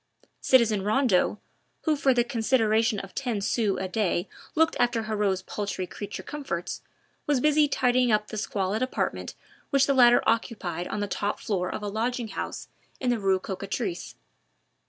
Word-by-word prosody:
Citizen 225 Hz, -6 st, +4 dB
Rondeau, 210 Hz, -1 st, +2 dB, 0.5 s
who 310 Hz, -2 st, +2 dB
for 275 Hz, -2 st, +3 dB
the 245 Hz, -2 st, +3 dB
consideration 225 Hz, -2 st, +2 dB
of 195 Hz, -1 st, -9 dB
ten 245 Hz, -6 st, -2 dB
sous 200 Hz, 0 st, 0 dB
a 190 Hz, -, -2 dB
day 185 Hz, -2 st, 0 dB, 0.3 s
looked 320 Hz, +1 st, +3 dB
after 240 Hz, -2 st, +2 dB
Heriot's 205 Hz, -3 st, 0 dB
paltry 200 Hz, -2 st, -3 dB
creature 205 Hz, +3 st, -7 dB
comforts, 270 Hz, -13 st, -5 dB, 0.5 s
was 290 Hz, -3 st, +3 dB
busy 300 Hz, +2 st, +4 dB
tidying 250 Hz, -3 st, +2 dB
up 210 Hz, 0 st, +1 dB
the 215 Hz, -, -5 dB
squalid 200 Hz, 0 st, -1 dB
apartment 255 Hz, -, -2 dB, 0.3 s
which 275 Hz, -1 st, +4 dB
the 275 Hz, -, +2 dB
latter 245 Hz, -2 st, +6 dB
occupied 220 Hz, -6 st, -1 dB
on 210 Hz, -, -3 dB
the 205 Hz, -, -1 dB
top 205 Hz, +1 st, -2 dB
floor 185 Hz, -3 st, -2 dB
of -, -, -5 dB
a -, -, -2 dB
lodging 230 Hz, +3 st, -2 dB
house 195 Hz, -, -5 dB, 0.3 s
in 250 Hz, -2 st, +1 dB
the 240 Hz, -, 0 dB
Rue 195 Hz, -2 st, +2 dB
Cocatrice. 195 Hz, -, -4 dB
220 Hz, 160 wpm, -27 LUFS, 200-255 Hz, 0.5 s, latter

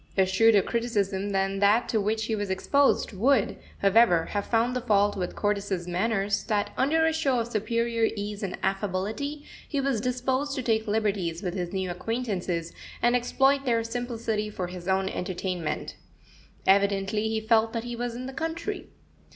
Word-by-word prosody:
A 190 Hz, -, +5 dB
shrewder 200 Hz, +2 st, +4 dB
criticism 205 Hz, -4 st, -1 dB
than 195 Hz, 0 st, 0 dB
that 205 Hz, +4 st, +4 dB
to 220 Hz, -, +1 dB
which 220 Hz, +2 st, 0 dB
he 225 Hz, -, -1 dB
was 205 Hz, -2 st, -3 dB
exposed 275 Hz, +8 st, +2 dB
would, 230 Hz, +3 st, +2 dB, 0.3 s
however, 195 Hz, -5 st, +5 dB
have 205 Hz, -1 st, -2 dB
found 235 Hz, +2 st, +1 dB
the 250 Hz, -, -1 dB
fault 205 Hz, -3 st, +2 dB
with 180 Hz, -3 st, -3 dB
Cordis's 200 Hz, -4 st, -1 dB
manners 200 Hz, +2 st, 0 dB
that, 210 Hz, -2 st, 0 dB
under 315 Hz, +5 st, +2 dB
a 320 Hz, -, +2 dB
show 275 Hz, -6 st, +1 dB
of 230 Hz, 0 st, -2 dB
superior 230 Hz, +1 st, 0 dB
ease 205 Hz, 0 st, -4 dB
and 195 Hz, -3 st, -3 dB
affability, 210 Hz, +10 st, -2 dB, 0.2 s
he 285 Hz, -, -1 dB
was 270 Hz, -5 st, 0 dB
disposed 260 Hz, +3 st, -1 dB
to 260 Hz, -, -3 dB
take 220 Hz, -1 st, +1 dB
liberties 200 Hz, -5 st, -1 dB
with 180 Hz, -2 st, -2 dB
his 180 Hz, -2 st, -3 dB
new 190 Hz, -2 st, -2 dB
acquaintances, 180 Hz, -4 st, -3 dB, 0.3 s
and 240 Hz, +1 st, +3 dB
exploit 270 Hz, +3 st, +2 dB
their 230 Hz, -3 st, +1 dB
simplicity 230 Hz, -2 st, -3 dB
for 190 Hz, -3 st, -4 dB
his 180 Hz, 0 st, -8 dB
own 190 Hz, 0 st, +1 dB
entertainment. 180 Hz, -3 st, -3 dB, 0.7 s
Evidently 200 Hz, +2 st, +2 dB
he 220 Hz, 0 st, 0 dB
felt 225 Hz, 0 st, +3 dB
that 230 Hz, -1 st, -3 dB
he 240 Hz, 0 st, -5 dB
was 240 Hz, 0 st, -3 dB
in 250 Hz, +1 st, -5 dB
the 265 Hz, -, -6 dB
country. 330 Hz, +7 st, -4 dB
215 Hz, 170 wpm, -27 LUFS, 195-240 Hz, 0.7 s, A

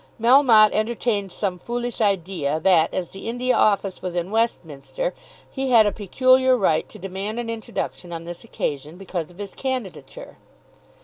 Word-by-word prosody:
Melmotte 230 Hz, -3 st, +6 dB
entertained 215 Hz, -3 st, -1 dB
some 185 Hz, -1 st, -3 dB
foolish 240 Hz, +3 st, -4 dB
idea 175 Hz, -7 st, 0 dB
that 165 Hz, -1 st, +3 dB
as 180 Hz, -2 st, -3 dB
the 195 Hz, +3 st, -7 dB
India 250 Hz, +2 st, 0 dB
Office 200 Hz, -2 st, +1 dB
was 180 Hz, -1 st, -5 dB
in 175 Hz, +2 st, -2 dB
Westminster, 225 Hz, -, -2 dB, 0.3 s
he 270 Hz, -1 st, -4 dB
had 230 Hz, -3 st, +6 dB
a 205 Hz, -, +2 dB
peculiar 255 Hz, +5 st, +3 dB
right 165 Hz, -8 st, +1 dB
to -, -, -12 dB
demand 195 Hz, +4 st, -5 dB
an 230 Hz, -1 st, -3 dB
introduction 215 Hz, -5 st, -5 dB
on 165 Hz, -1 st, -6 dB
this 175 Hz, 0 st, -8 dB
occasion 150 Hz, -7 st, -4 dB
because 180 Hz, -4 st, -5 dB
of 175 Hz, -, -17 dB
his 200 Hz, -1 st, -7 dB
candidature. 260 Hz, -, -6 dB
205 Hz, 160 wpm, -23 LUFS, 180-240 Hz, 0.3 s, Melmotte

